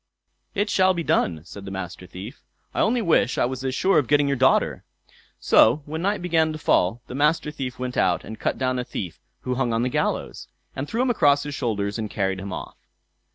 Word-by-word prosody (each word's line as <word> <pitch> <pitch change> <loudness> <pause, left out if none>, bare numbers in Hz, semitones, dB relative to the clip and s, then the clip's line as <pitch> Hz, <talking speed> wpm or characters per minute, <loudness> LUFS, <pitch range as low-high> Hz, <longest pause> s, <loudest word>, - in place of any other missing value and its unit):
"It 205 +1 0
shall 185 -1 +4
be 170 - -2
done", 85 - +1
said 100 +2 -10
the 100 - -7
Master 90 -1 -6
Thief. 95 +6 -9 0.3
"I - - -3
only 235 +2 +2
wish 165 -8 +2
I - - +3
was 130 +1 -4
as 130 -1 -1
sure 195 +4 +3
of 140 - -2
getting 145 -1 +3
your 140 - +1
daughter." 130 +1 +2 0.6
So 130 +7 +5
when 160 +2 -4
night 200 0 0
began 160 -3 +2
to - - -5
fall, 115 -5 +1
the - - -9
Master 150 +2 +1
Thief 130 -4 -5
went 125 0 -4
out 90 -2 +2
and 110 - -9
cut - - -1
down 130 -1 0
a - - -1
thief 90 -7 -6 0.2
who 125 - -2
hung 125 -2 0
on 115 +1 +1
the 125 - +1
gallows, - - -2 0.3
and 135 +2 -4
threw 235 +3 0
him 255 - +2
across 145 -10 +3
his 145 - -5
shoulders, 105 -5 -2
and 110 -1 -3
carried 95 -2 -1
him 95 0 -6
off. - - -7
130 Hz, 225 wpm, -24 LUFS, 105-155 Hz, 0.6 s, So